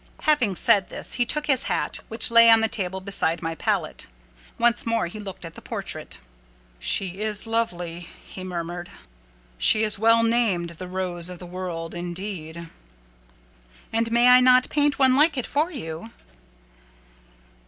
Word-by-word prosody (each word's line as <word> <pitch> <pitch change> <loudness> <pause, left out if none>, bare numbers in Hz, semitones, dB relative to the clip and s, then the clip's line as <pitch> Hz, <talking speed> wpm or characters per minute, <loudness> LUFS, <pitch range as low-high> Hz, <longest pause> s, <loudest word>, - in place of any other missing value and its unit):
'" - - -25
Having 265 - +2
said 205 -3 +3
this, - - -4
he 245 -1 0
took 300 0 -1
his 270 -3 +1
hat, - - -1
which 225 +1 0
lay 230 0 +8
on 225 -1 +7
the 225 - +2
table 190 -4 -3
beside 185 -4 0
my 165 0 -2
palette. - - -2 0.5
Once 235 0 +2
more 230 -3 0
he 175 +5 -7
looked 195 -4 -8
at 165 - -9
the - - -11
portrait. - - -5 0.6
"She 180 - -2
is 215 0 0
lovely," 175 -7 -3 0.2
he 185 - -9
murmured. 175 -1 -5 0.7
"She 215 - +4
is 215 -1 0
well 230 +1 +4
named 225 -7 +1
the 180 +2 -8
Rose 180 -2 -3
of 180 - -8
the 180 - -10
World, 175 -2 -5
indeed!" 175 -2 -6 1.3
"And 230 0 0
may 240 +1 +4
I 250 0 +8
not 255 0 +4
paint 290 -1 +2
one 260 -2 +4
like 300 +1 +3
it 255 - -1
for 305 +4 0
you?" 195 - -7
205 Hz, 165 wpm, -24 LUFS, 175-230 Hz, 1.3 s, lay